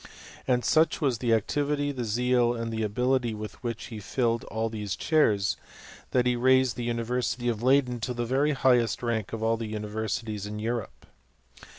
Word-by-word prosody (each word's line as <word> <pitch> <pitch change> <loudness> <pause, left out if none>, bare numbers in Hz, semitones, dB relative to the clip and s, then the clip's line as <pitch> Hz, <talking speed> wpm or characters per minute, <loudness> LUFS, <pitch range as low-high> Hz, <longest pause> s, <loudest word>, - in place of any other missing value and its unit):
And 125 -1 +2
such 160 +1 +3
was 135 -8 0
the 120 -2 0
activity, 145 +6 +1
the 125 -4 -4
zeal, 120 +2 +2
and 115 -1 -4
the 110 - -2
ability 120 +2 0
with 105 0 -8
which 115 0 -4
be 110 - -6
filled 115 +2 0
all 110 0 -2
these 105 -3 -4
chairs, 105 -11 +2 0.5
that 125 -1 +2
he 125 0 +2
raised 130 +1 +3
the 120 - -4
University 120 +1 -1
of 115 -2 -1
Leyden 130 -1 +3
to 120 +2 -3
the 120 0 -2
very 140 +5 +2
highest 125 -3 +2
rank 115 -3 -1
of 115 -1 -4
all 115 0 +2
the 110 -1 -5
universi 110 +1 -3
ties 105 -2 -4
of 105 +1 -5
Europe. 115 0 -4
120 Hz, 185 wpm, -27 LUFS, 110-125 Hz, 0.5 s, such